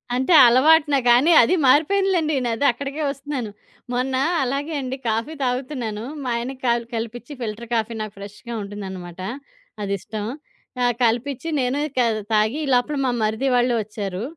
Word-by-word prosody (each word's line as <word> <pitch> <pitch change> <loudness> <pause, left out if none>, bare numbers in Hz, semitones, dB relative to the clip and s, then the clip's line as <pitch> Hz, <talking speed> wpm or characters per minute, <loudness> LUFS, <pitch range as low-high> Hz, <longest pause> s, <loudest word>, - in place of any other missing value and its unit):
అంటే 260 +8 +2
అలవాటున 295 +4 +5
గానీ 255 +8 +5
అదీ 300 +10 +3
మారిపోయిందిలెండి. 320 +2 +3
న - - 0
అది 285 - -1
అక్కడికే 280 +5 -5
ఒస్తున్నాను. 275 -4 -4 0.4
మొన్న 255 +2 -1 0.3
అలాగే 280 +5 -2
అండి, 260 0 -4
కాఫీ 230 +8 -1
తాగుతున్నాను. 250 -4 -3 0.2
మా 250 - -3
ఆయనకి 255 +3 -5
కల్ 235 -1 +2
కలిపిచ్చి 235 +4 -5
ఫిల్టర్ 225 +1 -5
కాఫీ 230 0 0
నాకు 215 -1 -5
ఫ్రెష్‌గా 205 +4 -9
ఉంటుందనమాట. 190 -3 -7 0.6
అదిష్టం. 205 +2 -4 0.6
ఆహ్, 245 -1 +3
కలిపిచ్చి, 245 +7 0
నేను 255 +3 0 0.2
కా 245 - +4 0.3
తాగి 215 +5 +2
ఈ - - -5
లోపల 250 +5 +1
మా 250 - +1
మరిది 220 +5 0
వాళ్ళు 245 0 +2
ఒచ్చారు. 200 -1 -5
245 Hz, 145 wpm, -22 LUFS, 220-275 Hz, 0.6 s, అలవాటున